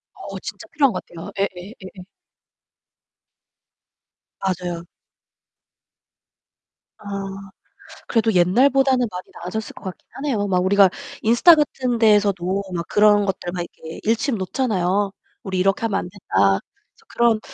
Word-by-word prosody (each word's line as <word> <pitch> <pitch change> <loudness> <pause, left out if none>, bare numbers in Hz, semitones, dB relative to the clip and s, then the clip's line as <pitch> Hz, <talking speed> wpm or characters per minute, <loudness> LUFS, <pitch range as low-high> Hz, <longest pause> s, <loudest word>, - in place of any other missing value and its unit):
어 - - -8
진짜 - - -8
필요한 275 -5 +3
것 - - -4
같아요. 165 -1 -9
예 200 - +3
예 185 +5 -9
예예. 185 0 -10 2.4
맞아요. 180 -3 -3 2.1
아, - - -18 1.0
그래도 225 -1 +2
옛날보다는 255 +8 +3
많이 180 -2 -6
나아졌을 200 +5 -5
것 - - -14
같긴 185 - -8
하네요. 255 -8 -1
막 180 -2 +1
우리가 195 0 +6 0.3
인스타 240 +10 +6
같은 260 -5 0
데에서도 200 -4 +2
막 170 -1 -3
그런 210 -1 +4
것들 185 -2 -3
막 180 - -3
이렇게 160 0 -10
일침 230 +4 +1
놓잖아요. 195 -2 0 0.3
"우리 190 -1 -2
이렇게 195 +1 +2
하면 225 -3 +1
안 - - -6
된다." 100 - +1 0.3
그래서 - - -28
그런 235 -2 +2
200 Hz, 275 characters per minute, -21 LUFS, 180-230 Hz, 2.4 s, 우리가